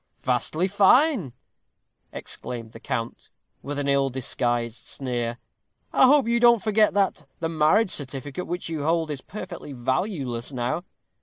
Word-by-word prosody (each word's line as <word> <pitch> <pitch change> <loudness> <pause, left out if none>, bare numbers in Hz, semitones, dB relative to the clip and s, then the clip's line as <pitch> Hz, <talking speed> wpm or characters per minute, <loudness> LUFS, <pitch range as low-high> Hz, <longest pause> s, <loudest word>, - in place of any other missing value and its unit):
"Vastly 170 +4 +1
fine!" 205 - +4 0.8
exclaimed 115 -2 -7
the 115 - -11
count, 115 0 -4 0.3
with 145 +1 -5
an 145 -1 -2
ill 140 -1 +2
disguised 120 -2 -2
sneer. 120 -3 -3 0.6
"I 260 - +6
hope 275 -3 +5
you 235 0 +2
don't 235 -1 +6
forget 215 -2 +3
that 195 -7 0
the 165 - -1
marriage 165 +6 +3
certificate 140 +4 -3
which 175 +1 -4
you 160 -2 -3
hold 160 0 +1
is 140 -3 -4
perfectly 175 -7 -8
valueless 130 - -2
now. 130 +7 -2
150 Hz, 140 wpm, -25 LUFS, 125-195 Hz, 0.8 s, I